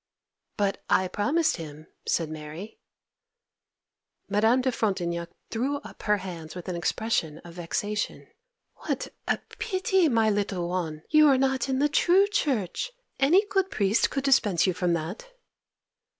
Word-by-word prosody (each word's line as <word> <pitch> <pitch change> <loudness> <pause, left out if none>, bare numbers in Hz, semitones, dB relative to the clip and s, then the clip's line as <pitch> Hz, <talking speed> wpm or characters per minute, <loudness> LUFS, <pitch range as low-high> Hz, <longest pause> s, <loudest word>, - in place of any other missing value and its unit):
_' - - -45
'But 200 -1 0
I 185 - +3
promised 310 - +1
him,' 155 -2 -9 0.2
said 165 - +1
Mary. 155 +6 -8 1.5
Madame 220 +5 +3
de 260 0 +1
Frontignac 175 -7 -1 0.2
threw 260 +5 0
up - - -12
her 210 -1 +2
hands 175 -4 -7
with 180 0 -8
an 180 - -2
expression 170 -3 -1
of 170 - -10
vexation. 205 +5 -3 0.5
'What - - -3 0.2
a - - +2 0.2
pity, 380 -5 +2
my 225 -3 +3
little 200 -4 -1
one, 165 -4 -3
you 305 -1 +7
are 275 -2 +5
not 265 -1 +1
in 260 - +1
the 290 +2 +3
true 355 +6 +4
Church! 295 - -1 0.3
Any 345 +10 +5
good 390 -1 0
priest 205 - +2
could 275 - -2
dispense 225 - +3
you 185 - +2
from 175 0 0
that. 175 - -5
210 Hz, 150 wpm, -27 LUFS, 175-275 Hz, 1.5 s, you